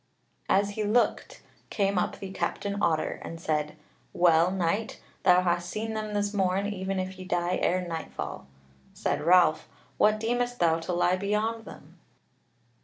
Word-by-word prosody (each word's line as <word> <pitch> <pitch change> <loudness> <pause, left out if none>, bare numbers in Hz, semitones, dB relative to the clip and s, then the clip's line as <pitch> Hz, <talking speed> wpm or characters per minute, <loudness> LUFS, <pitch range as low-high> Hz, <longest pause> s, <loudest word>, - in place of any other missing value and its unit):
As 200 +1 +3
he 215 +1 -3
looked, 220 +4 0 0.3
came 200 -3 +1
up - - -2
the 195 -1 -7
Captain 200 +1 -2
Otter, 160 -3 0
and 165 - -7
said: 150 -2 -1 0.4
"Well, 170 0 +4
Knight, 190 +4 -1 0.2
thou 180 -1 +5
hast 175 -1 0
seen 220 +3 -3
them 215 -1 -4
this 205 0 0
morn, 190 0 +1
even 195 -1 -2
if 185 0 -5
ye - - -6
die 175 0 0
ere 180 0 +1
nightfall." 160 - -6 0.5
Said - - -1
Ralph: 175 0 +4 0.3
"What 215 0 +4
deemest 245 +2 -1
thou 165 -1 +3
to 165 +2 -4
lie 175 +1 +2
beyond 215 +3 -1
them?" - - -13
190 Hz, 155 wpm, -28 LUFS, 175-210 Hz, 0.5 s, thou